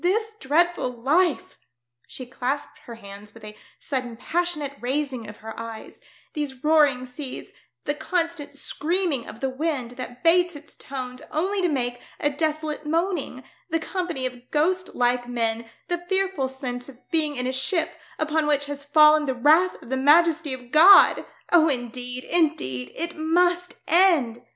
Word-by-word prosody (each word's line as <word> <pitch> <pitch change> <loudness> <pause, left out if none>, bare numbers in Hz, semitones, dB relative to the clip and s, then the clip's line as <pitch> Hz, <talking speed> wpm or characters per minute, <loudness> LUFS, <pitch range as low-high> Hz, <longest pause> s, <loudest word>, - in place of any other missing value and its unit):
This 435 +5 +1
dreadful 335 +1 +1
life 285 +8 0
I" - - -40 0.4
she 255 - -7
clasped 255 +3 -4
her 235 - -8
hands 205 0 -11
with 225 - -14
a 210 0 -8 0.2
sudden 255 -5 -4
passionate 325 -1 -2
raising 255 -3 -2
of 210 - -11
her 220 0 -8
eyes, 230 -1 -9 0.2
" - - -32
these 280 -4 -5
roaring 295 -5 +3
seas, 255 +1 -7 0.3
the 290 - -1
constant 330 -1 -2
screaming 320 -3 -1
of 220 - -10
the 270 - 0
wind 265 -3 -2
that 250 +1 -8
bates 350 0 +4
its 295 +2 -11
tones 255 -2 -7
only 380 +6 -1
to 360 - +2
make 245 -5 -2 0.2
a 290 - +1
desolate 310 0 -2
moaning, 320 -4 -2 0.3
the 325 - +1
company 345 -6 -3
of 250 -1 -7
ghost 365 +5 0
like 245 0 +1
men, 230 -1 -1 0.2
the 350 -1 -1
fearful 380 -8 0
sense 255 -1 -6
of 260 - -13
being 310 -3 +1
in 250 -1 -1
a 255 - -1
ship 310 +6 0 0.3
upon 310 0 0
which 290 -1 +1
has 285 0 -6
fallen 300 +1 +5
the 265 - -1
wrath 315 +9 +3
of - - -13
the 265 - -1
majesty 315 +2 +4
of 250 -2 -7
God! 360 +6 +7 0.2
Oh, 325 -2 +5
indeed, 250 -1 -3
indeed 130 - 0
it 340 +1 -3
must 350 +3 +1
end 320 -10 +3
290 Hz, 165 wpm, -24 LUFS, 250-330 Hz, 0.4 s, God